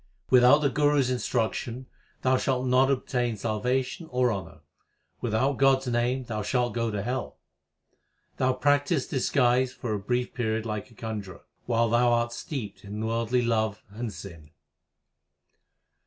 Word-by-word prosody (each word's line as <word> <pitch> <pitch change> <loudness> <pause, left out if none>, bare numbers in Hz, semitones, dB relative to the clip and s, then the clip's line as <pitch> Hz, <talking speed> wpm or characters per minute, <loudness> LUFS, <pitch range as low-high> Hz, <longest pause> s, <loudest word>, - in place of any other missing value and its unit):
Without 130 +4 +7
the 140 - +3
Guru 145 +1 +2
s 130 -2 +2
instruction 120 0 -2 0.4
thou 130 0 +4
shalt 130 0 0
not 130 +1 +4
obtain 125 -4 -1
salvation 125 - -1
or 125 -1 +2
honour; 80 -5 -7 0.6
without 120 +4 +1
God 135 -1 +5
s 130 - -9
name 125 +2 0
thou 110 -3 -4
shalt 120 +4 0
go 115 -1 -1
to 105 -2 -3
hell. 125 +2 -3 1.0
Thou 130 0 +2
practisest 145 +2 +1
disguise 125 -1 +2
for 115 -4 -4
a 105 - -1
brief 125 +5 -2
period 110 -2 -1
like 105 0 -4
a 115 - -19
conjurer, 105 -5 -6 0.2
while 115 -1 +2
thou 120 +1 +3
art 120 0 0
steeped 115 -6 -6
in 105 +2 -5
worldly 115 +2 0
love 110 -3 0
and 115 +2 -5
sin. 80 -4 -10
120 Hz, 150 wpm, -27 LUFS, 110-130 Hz, 1.0 s, Without